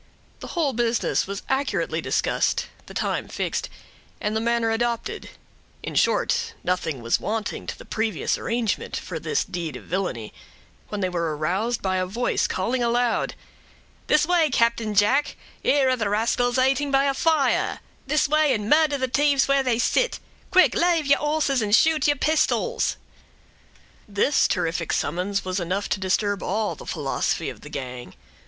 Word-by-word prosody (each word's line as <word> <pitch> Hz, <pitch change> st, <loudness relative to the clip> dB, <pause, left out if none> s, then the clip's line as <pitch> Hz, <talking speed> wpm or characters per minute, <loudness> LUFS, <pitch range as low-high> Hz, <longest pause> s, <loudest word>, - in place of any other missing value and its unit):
The -, -, -8 dB
whole 295 Hz, -5 st, +1 dB
business 235 Hz, -3 st, 0 dB
was 200 Hz, 0 st, -5 dB
accurately 270 Hz, +1 st, -1 dB
discussed, -, -, 0 dB, 0.2 s
the -, -, -10 dB
time -, -, -1 dB
fixed, -, -, -3 dB, 0.5 s
and 210 Hz, 0 st, -2 dB
the 220 Hz, -, 0 dB
manner 235 Hz, -1 st, +1 dB
adopted; 235 Hz, +1 st, -2 dB, 0.5 s
in -, -, -5 dB
short, -, -, +1 dB
nothing 160 Hz, -8 st, -2 dB
was 115 Hz, -, +2 dB
wanting 215 Hz, 0 st, -3 dB
to -, -, -5 dB
the -, -, -12 dB
previous 220 Hz, -5 st, -1 dB
arrangement 230 Hz, -2 st, -2 dB
for -, -, -5 dB
this 445 Hz, -, -1 dB
deed 170 Hz, -3 st, -5 dB
of -, -, -9 dB
villainy, 175 Hz, -, -3 dB, 0.6 s
when 210 Hz, -1 st, -4 dB
they 185 Hz, -, 0 dB
were 170 Hz, -4 st, -2 dB
aroused 195 Hz, +10 st, -1 dB
by 190 Hz, -1 st, 0 dB
a 185 Hz, 0 st, -1 dB
voice 235 Hz, +6 st, 0 dB
calling 235 Hz, +7 st, -1 dB
aloud,— 240 Hz, 0 st, +1 dB, 0.7 s
"This 300 Hz, 0 st, +4 dB
way, 340 Hz, -2 st, +3 dB
Captain 230 Hz, -4 st, +1 dB
Jack—here 270 Hz, +4 st, +1 dB
are 255 Hz, -, +3 dB
the 220 Hz, -5 st, -1 dB
rascals 240 Hz, +4 st, +1 dB
'ating 270 Hz, +2 st, +2 dB
by 275 Hz, 0 st, +3 dB
a 275 Hz, -, +2 dB
fire—this 300 Hz, -1 st, 0 dB
way, 305 Hz, -1 st, +3 dB
and 210 Hz, -1 st, -4 dB
murder 300 Hz, +1 st, +4 dB
the 260 Hz, -1 st, -1 dB
t'ieves 280 Hz, +1 st, +2 dB
where 275 Hz, 0 st, +3 dB
they 250 Hz, -4 st, +1 dB
sit—quick, 370 Hz, -, +1 dB
l'ave 340 Hz, -2 st, +2 dB
your 280 Hz, -, +5 dB
horses 295 Hz, -3 st, +1 dB
and 210 Hz, 0 st, +3 dB
shoot 310 Hz, +1 st, +3 dB
your 290 Hz, -, +3 dB
pistols!" 320 Hz, -, +1 dB, 1.1 s
This 210 Hz, +7 st, +2 dB
terrific 170 Hz, -2 st, -1 dB
summons 185 Hz, +5 st, -1 dB
was 185 Hz, +1 st, -1 dB
enough 185 Hz, +3 st, -2 dB
to -, -, 0 dB
disturb 200 Hz, +1 st, 0 dB
all 210 Hz, +2 st, -1 dB
the -, -, -12 dB
philosophy 150 Hz, +1 st, -1 dB
of -, -, -14 dB
the 150 Hz, -, -10 dB
gang. 125 Hz, -8 st, -7 dB
230 Hz, 160 wpm, -24 LUFS, 190-275 Hz, 1.1 s, your